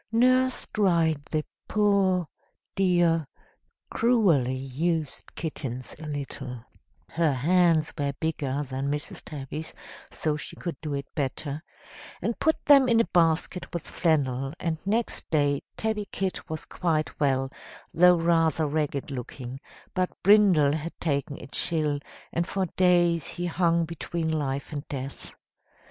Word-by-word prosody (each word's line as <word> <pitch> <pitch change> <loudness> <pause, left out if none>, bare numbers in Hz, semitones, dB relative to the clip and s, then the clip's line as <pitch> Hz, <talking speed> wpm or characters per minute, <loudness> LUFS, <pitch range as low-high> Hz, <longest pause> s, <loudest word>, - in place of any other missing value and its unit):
"Nurse 255 +2 +3
dried 170 -7 +2
the 155 0 -2 0.2
poor, 195 -4 +2 0.5
dear, 175 -5 +3 0.6
cruelly 185 - +3
used 150 +4 -3
kittens 130 -6 -5
a 155 - -7
little 135 -4 -5 0.4
(her 165 -2 +2
hands 165 +3 +3
were 145 -2 -1
bigger 145 -2 -2
than 135 0 -3
Mrs. 145 +1 -3
Tabby's, 150 +2 -6 0.3
so 155 -1 -1
she 150 - -6
could 170 -3 -4
do 150 -2 -3
it 140 -1 -3
better), 145 +1 -3 0.6
and 230 +5 -2
put 315 - +1
them 275 -3 +7
in 230 -1 +5
a 230 - +4
basket 170 +1 +2
with 170 - -4
flannel, 135 -5 0
and 160 -2 -2
next 225 +3 -1
day 145 -3 +2 0.2
Tabby 220 -2 -1
Kit 190 -1 -3
was 155 0 -4
quite 160 -3 -1
well, 135 -2 +1 0.4
though 180 +1 +6
rather 165 -2 +2
ragged 145 -2 -1
looking; 125 0 -6 0.3
but 185 -1 +1
Brindle 195 -8 +6
had 160 +2 -5
taken 140 -2 -1
a - - -9
chill, 150 0 -1 0.3
and 170 +1 0
for 190 0 0
days 175 -3 +3
he 175 - -4
hung 170 -1 +2
between 165 0 -3
life 140 -3 -2
and 145 -1 -3
death. 135 -1 -7
160 Hz, 135 wpm, -27 LUFS, 140-180 Hz, 0.6 s, them